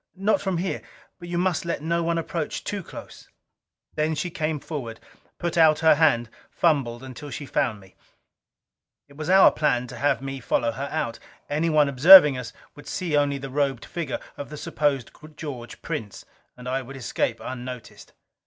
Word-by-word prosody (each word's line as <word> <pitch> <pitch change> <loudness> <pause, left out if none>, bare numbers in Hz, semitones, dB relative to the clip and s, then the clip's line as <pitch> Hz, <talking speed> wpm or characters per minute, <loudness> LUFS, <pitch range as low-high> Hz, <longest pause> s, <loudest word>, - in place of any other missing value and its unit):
"Not 195 +3 +1
from 190 -3 -1
here. 185 +3 -2 0.4
But 175 -1 -9
you 175 - -2
must 180 -1 0
let 170 -3 -3
no 170 +1 0
one 170 0 0
approach 165 -1 -3
too 205 -1 -3
close." - - -11 0.6
Then 155 +1 0
she 175 +3 -3
came 155 -3 -2
forward, 125 -8 -6 0.4
put 170 -1 -2
out 155 -1 +6
her 160 - +8
hand, 145 -7 +3 0.2
fumbled 135 -7 0
until 130 +3 -9
she 140 +2 -6
found 120 -5 -1
me. 95 -1 -18 1.1
It 140 - -18
was 155 +3 -5
our 190 +1 +7
plan 125 -5 +1
to - - -9
have 145 - +1
me 135 0 -6
follow 115 -1 0
her 135 +4 -5
out. 120 -7 -2 0.3
Anyone 155 -1 +3
observing 150 +2 +9
us 125 -3 -6 0.2
would 145 - -13
see 175 -5 -2
only 145 -1 +2
the 135 -1 -7
robed 135 -4 -1
figure 165 -6 -4 0.2
of 145 - -7
the 150 - -8
supposed 140 -5 -1 0.3
George 125 -7 -7
Prince, 105 -3 -5 0.3
and 125 0 -10
I 130 +1 -1
would 135 +1 -10
escape 120 -3 -2
unnoticed. 125 -1 -8
145 Hz, 175 wpm, -24 LUFS, 130-165 Hz, 1.1 s, observing